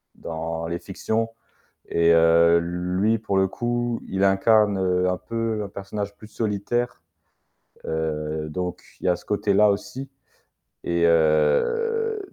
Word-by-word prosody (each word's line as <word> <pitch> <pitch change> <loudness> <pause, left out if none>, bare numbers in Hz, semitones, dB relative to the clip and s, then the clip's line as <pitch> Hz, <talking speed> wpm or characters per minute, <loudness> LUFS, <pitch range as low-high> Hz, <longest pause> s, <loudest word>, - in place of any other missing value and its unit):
dans 80 0 -5
les 85 +1 -3
fictions 110 +3 -2 0.6
et 85 0 +3
heu, 85 +1 +5
lui 90 +6 0
pour 105 -2 -2
le 95 0 +4
coup, 120 +1 -2
il 95 +1 0
incarne, 100 +1 +4
heu, 90 -1 +1
un 90 - -2
peu 115 -2 -3
un - - -6
personnage 100 +1 -6
plus 110 - -13
solitaire. 110 +1 -2 0.8
Heu, 75 -1 -3
donc 90 +3 -4 0.2
il - - -7
y - - +4
a 90 - +3
ce - - -13
côté-là 105 0 +3
aussi 125 +6 -5 0.7
et 85 0 0
heu 85 - +2
95 Hz, 135 wpm, -24 LUFS, 85-110 Hz, 0.8 s, heu